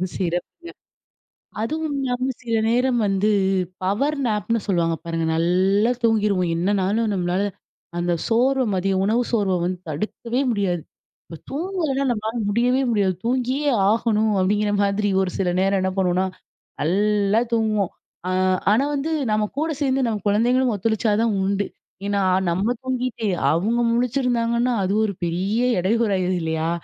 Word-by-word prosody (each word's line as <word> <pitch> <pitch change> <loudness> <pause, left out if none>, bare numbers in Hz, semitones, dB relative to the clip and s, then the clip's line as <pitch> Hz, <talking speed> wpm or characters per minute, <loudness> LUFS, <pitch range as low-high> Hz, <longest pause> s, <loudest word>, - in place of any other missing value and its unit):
சிறப்புங்க. 180 - -4 0.9
அதுவும் 310 +4 -2
இல்லாம 255 -1 -1 0.2
சில 230 -2 -1
நேரம் 245 +1 +2
வந்து, 195 +2 +1 0.5
பவர் 275 +11 0
நேப்னு 220 +1 0
சொல்லுவாங்க 170 -4 +1
பாருங்க, 165 -1 -2
நல்லா 190 +6 +2
தூங்கிருவோம் 205 -6 +2
என்னனாலும் 205 +4 +1
நம்மளால 180 +1 0 0.6
அந்த 175 0 0 0.2
சோர்வ, 255 +3 +2
மதியம் 190 +1 0
உணவு 230 +4 +2
சோர்வ 200 -5 +1
வந்து 180 0 -2
தடுக்கவே 230 - -3
முடியாது. 190 -7 -1 0.4
இப்போ 165 - -9
தூங்கலனா 310 -4 -1
நம்ளால 220 0 -2
முடியவே 245 +5 +2
முடியாது. 200 -4 +1
தூங்கியே 260 +4 0 0.2
ஆகணும் 220 -1 +1
அப்டிங்ற 205 +2 +1
மாதிரி 200 +1 +1
ஒரு 185 - -1
சில 185 -2 +1
நேரம் 195 0 +2
என்ன 190 - 0
பண்ணுவோனா, 185 0 +2 0.6
நல்லா 205 +5 +2
தூங்குவோம், 215 -4 +1 0.4
அ - - 0 0.4
ஆனா 250 +6 +3
வந்து 295 +4 -2 0.2
நம்ம 215 0 +2
கூட 320 +1 0
சேந்து, 265 -2 +1
நம்ம 215 -3 -2
குழந்தைங்களும் 240 +3 +2
ஒத்துழைச்சா 220 +2 0
தான் 220 -3 +1
உண்டு. 200 +1 0 0.4
ஏன்னா, 200 -1 0 0.3
நம்ம 195 +8 +1
தூங்கிட்டு 255 -4 -2 0.2
அவங்க 220 +9 +1
முழிச்சிருந்தாங்கன்னா, 240 -1 +1
அது 190 +2 0
ஒரு 200 - -2
பெரிய 190 +7 -1 0.2
இடையூறாயிருது 190 -2 +1
இல்லையா? 160 0 -1
210 Hz, 130 wpm, -22 LUFS, 190-245 Hz, 0.9 s, ஆனா